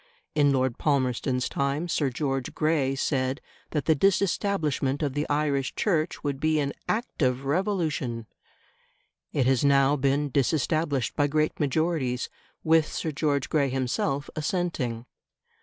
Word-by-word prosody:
In 145 -2 +4
Lord 130 -2 0
Palmerston's 130 -3 +1
time 140 +5 -1
Sir 150 -4 +1
George 135 0 -2
Grey 155 -4 +1
said 135 0 0 0.3
that 150 -3 -2
the 160 - +5
disestablishment 165 -5 +1
of 140 -3 -1
the 145 +2 -2
Irish 145 -2 0
Church 165 -5 0
would 140 -2 -2
be 155 +1 +2
an 140 -1 -1 0.2
"act 230 -5 -2
of 130 0 +1
Revolution"; 155 - -1 1.1
it 135 - +1
has 130 0 +3
now 140 0 +4
been 140 +1 +1
disestablished 145 -1 0
by 145 - +2
great 155 +1 0
majorities, 145 -3 0 0.3
with 160 -1 +4
Sir 160 - -2
George 145 -2 0
Grey 140 -3 +1
himself 135 +2 -1
assenting. 150 -8 -2
145 Hz, 135 wpm, -26 LUFS, 135-155 Hz, 1.1 s, the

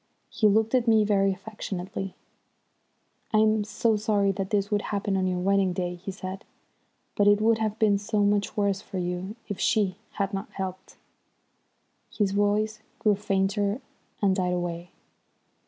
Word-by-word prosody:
He 215 - +3
looked 220 +3 +2
at 250 -2 +2
me 220 -1 +5
very 195 -1 +3
affectionately. 195 -1 -5 1.2
"I'm 215 0 +4
so 220 +1 +1
sorry 205 -2 +2
that 195 0 -3
this 205 -1 0
should 205 -1 +1
happen 200 -1 -2
on 190 -1 +1
your 180 -1 0
wedding 195 0 +2
day," 180 0 -2
he 180 +3 -8
said. 190 0 -6 0.7
"But 205 - +3
it 205 0 +6
would 225 +1 +3
have 215 -1 -1
been 205 -3 +3
so 210 0 0
much 205 0 +1
worse 200 -1 +1
for 200 - -7
you 180 +3 -3
if 205 - -5
she 205 -4 +2 0.2
had 200 -1 -2
not 195 - -4
helped." 190 -1 -6 1.1
His 205 -3 0
voice 210 +2 +1 0.2
grew 210 - +3
fainter 200 +1 0 0.4
and 195 -2 +4
died 180 -2 0
away. 175 0 -3
200 Hz, 155 wpm, -27 LUFS, 190-210 Hz, 1.2 s, it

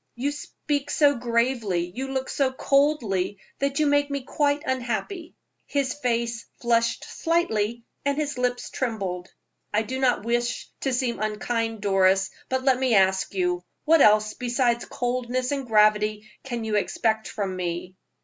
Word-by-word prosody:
You 270 +4 -1
speak 290 -1 -3
so 290 -2 +4
gravely, 235 -7 0
you 270 +4 -4
look 265 0 -2
so 270 -2 +1
coldly, 260 -9 +1 0.2
that 280 0 0
you 310 - +3
make 285 0 +3
me 280 -1 -3
quite 290 +2 0
unhappy." 260 - -3 0.3
His 275 -3 0
face 235 -4 -2
flushed 230 -1 +1
slightly 235 -10 0 0.2
and 280 0 0
his 295 -1 -1
lips 245 0 -1
trembled. 195 -8 -3 0.4
"I 210 +1 +2
do 260 +4 -4
not 250 -5 +2
wish 240 +1 -1
to 270 - -1
seem 245 -1 -1
unkind, 225 +1 -2
Doris, 190 -1 +3 0.2
but 260 0 0
let 260 -2 +3
me 255 -4 +2
ask 190 0 +2
you 180 -1 0 0.2
what 325 -1 +5
else 215 -1 +5
besides 240 -1 0
coldness 250 +1 -2
and 275 -3 -2
gravity 215 -1 +3 0.2
can 240 -4 -4
you 215 -1 0
expect 220 +1 0
from 195 -3 -3
me?" 180 0 -4
240 Hz, 150 wpm, -25 LUFS, 215-270 Hz, 0.4 s, what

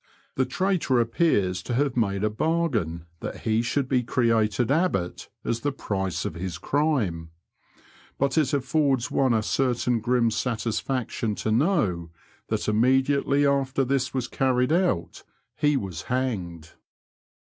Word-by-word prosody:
The 130 -1 0
traitor 175 -4 +1
appears 115 - +1
to 120 - -3
haye 140 +2 +2
made 100 -4 0
a 110 - +2
bargain 115 - -1
that - - -6
he 110 0 +1
should 130 +3 -1
be 130 -1 +2
created 115 -1 +1
Abbot 140 - 0 0.2
as 115 - -1
the 145 +4 -1
price 95 -8 -3
of - - -3
his 90 0 -5
crime; 120 - 0 0.9
but 140 -1 0
it 155 -4 +3
a£E6rds 140 -2 +1
one 135 -2 +2
a 110 - +1
certain 125 0 +1
grim 120 0 +2
satisfaction 115 -1 -2
to 110 - -2
know 110 - +1 0.4
that - - -2
immediately 135 +5 +2
after 135 -1 +1
this 130 0 0
was 130 -2 -2
carried 125 +1 +1
out 170 - 0 0.3
he 150 -1 +2
was 95 - -4
hanged. 95 -11 -3
125 Hz, 135 wpm, -25 LUFS, 105-140 Hz, 0.9 s, it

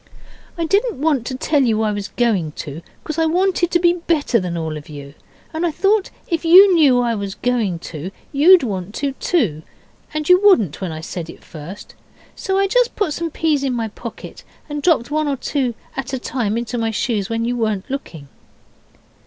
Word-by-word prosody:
'I 335 - -1
didn't 405 - +1
want 285 -6 +1
to 260 - -3
tell 290 +2 +1
you 220 -4 +2
I 215 - +1
was 205 -1 -4
going 200 -11 0
to, 150 +1 -7 0.2
because 310 +1 -4
I 325 - +3
wanted 355 +1 +1
to 350 - +3
be 345 0 +3
better 330 -8 +1
than 180 -3 -3
all 160 -1 -3
of 150 0 -9
you, 140 -1 -9 0.4
and 320 +2 -2
I 345 - +2
thought 395 +5 +1 0.2
if 335 -1 -1
you 370 +4 +8
knew 285 -7 +5
I 240 -1 +1
was 200 -2 -4
going 230 -8 0 0.2
to 155 +4 -5 0.2
you'd 325 +4 +6
want 195 -3 -4
to 280 -1 -1
too, 210 - 0 0.5
and 305 -1 -3
you 360 +1 +6
wouldn't 230 - +4
when 185 -3 -3
I 155 0 -6
said 165 0 -6
it - - -12
first. 165 +6 -10 0.4
So 385 0 -1
I 395 - +3
just 485 +4 +1
put 375 -8 0
some 335 +2 -3
peas 310 -3 0
in 265 -2 0
my 225 -2 -2
pocket 230 +2 -9 0.2
and 295 -1 -4
dropped 290 -6 +2
one 310 0 0
or 280 -1 -1
two 255 -3 -2 0.2
at 270 0 -5
a - - 0
time 235 -4 -2
into 240 0 -3
my 225 0 0
shoes 220 -2 -1
when 230 0 -1
you 245 +1 -1
weren't 215 -4 -1
looking. 170 - -6
255 Hz, 205 wpm, -19 LUFS, 205-325 Hz, 0.5 s, you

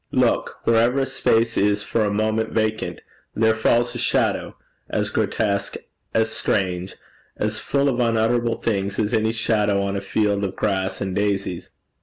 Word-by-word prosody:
Look: - - +1
wherever 115 +4 +3
a - - +1
space 115 -3 +1
is 105 0 +2
for 115 - 0
a - - +1
moment 110 +1 0
vacant, 110 0 -1 0.3
there 110 0 +3
falls 120 +2 +2
a 120 - -5
shadow, - - 0 0.3
as - - -1
grotesque, 100 -2 0 0.4
as 110 0 +1
strange, 90 -1 -1 0.4
as - - -1
full 140 0 0
of 130 -3 0
unutterable 115 0 +2
things 100 -3 -2
as 110 +1 0
any 110 0 +2
shadow 105 -3 +1
on 100 0 -2
a 100 - -2
field 100 -1 0
of 95 -1 -2
grass 95 -2 -1
and 95 -2 -2
daisies.' 100 -3 -1
110 Hz, 160 wpm, -22 LUFS, 100-115 Hz, 0.4 s, wherever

